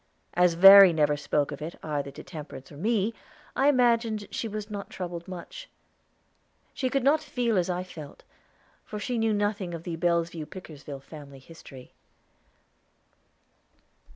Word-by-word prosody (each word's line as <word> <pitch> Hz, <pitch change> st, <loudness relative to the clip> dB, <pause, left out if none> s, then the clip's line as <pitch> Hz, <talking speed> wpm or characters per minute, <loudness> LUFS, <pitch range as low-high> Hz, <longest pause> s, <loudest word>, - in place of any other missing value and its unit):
As 180 Hz, -1 st, +3 dB
Verry 195 Hz, 0 st, +10 dB
never 150 Hz, -2 st, +2 dB
spoke 145 Hz, 0 st, -1 dB
of 145 Hz, -, -7 dB
it 160 Hz, +3 st, -6 dB
either 145 Hz, -2 st, -3 dB
to 140 Hz, -, -11 dB
Temperance 150 Hz, -5 st, -10 dB
or -, -, -11 dB
me, 215 Hz, +5 st, 0 dB, 0.4 s
I 270 Hz, -, +3 dB
imagined 235 Hz, -5 st, +2 dB
she 230 Hz, -, -3 dB
was 210 Hz, -1 st, -5 dB
not 205 Hz, -2 st, -7 dB
troubled 175 Hz, -2 st, -6 dB
much. 185 Hz, -, -9 dB, 1.0 s
She 260 Hz, -, -1 dB
could 275 Hz, -1 st, 0 dB
not 290 Hz, +3 st, +4 dB
feel 245 Hz, -6 st, -1 dB
as 180 Hz, -1 st, +1 dB
I 180 Hz, 0 st, -2 dB
felt, 155 Hz, -6 st, -11 dB, 0.6 s
for 210 Hz, -, -7 dB
she 240 Hz, +3 st, -2 dB
knew 225 Hz, 0 st, +2 dB
nothing 205 Hz, -4 st, -1 dB
of 165 Hz, -, -8 dB
the 170 Hz, -2 st, -4 dB
Bellevue 170 Hz, -2 st, -1 dB
Pickersgill 150 Hz, -6 st, -10 dB
family 140 Hz, -1 st, -12 dB
history. 135 Hz, -2 st, -14 dB
180 Hz, 150 wpm, -27 LUFS, 155-215 Hz, 1.0 s, Verry